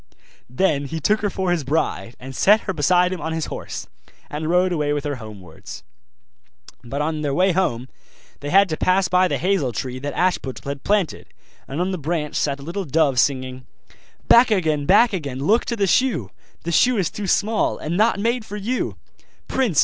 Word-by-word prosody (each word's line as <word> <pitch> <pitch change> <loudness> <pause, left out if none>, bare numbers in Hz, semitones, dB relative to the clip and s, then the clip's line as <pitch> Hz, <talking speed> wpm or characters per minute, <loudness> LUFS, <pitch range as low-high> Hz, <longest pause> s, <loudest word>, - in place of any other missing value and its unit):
Then 140 +1 +1
he 160 +4 -4
took 210 +8 +1
her 205 - 0
for 190 -2 -1
his 170 -4 0
bride, 135 -4 -2
and 130 +1 -9
set 210 - +5
her 190 - -3
beside 180 +4 +2
him 180 - -6
on 160 +2 -3
his 160 -1 -2
horse, - - -6 0.5
and 155 +2 -3
rode 180 +1 +3
away 150 -3 0
with 145 -1 -2
her 145 -2 -3
homewards. 105 -5 -11 1.0
But 140 +5 -3
on 155 0 -2
their 145 -2 -1
way 185 +2 +3
home 130 -10 -1 0.5
they 145 - -5
had 195 +4 +5
to 155 - -2
pass 185 0 +2
by 185 0 +4
the - - -1
hazel 180 -9 0
tree 125 +3 -4
that 145 +1 -5
Ashputtel 175 -7 -1
had 140 0 -5
planted; 200 -6 0 0.4
and 140 - -5
on 185 +2 0
the 185 - -3
branch 150 0 -3
sat 140 -1 0
a - - -10
little 175 +6 -4
dove 145 -4 +2
singing: 130 -1 -1 0.6
'Back 240 +1 +7
again! 155 -8 0
back 220 +4 +5
again! 145 -8 -4
look 215 +11 +2
to 235 - -2
the 205 -3 +1
shoe! 180 - +1 0.3
The 170 - -3
shoe 245 +8 +4
is 185 -5 0
too 205 -2 -5
small, 215 +4 +1
and 160 +3 -4
not 215 +1 +2
made 235 +3 0
for 210 -1 -7
you! 230 +5 -2 0.5
Prince! 235 - +1
165 Hz, 200 wpm, -22 LUFS, 140-195 Hz, 1.0 s, Back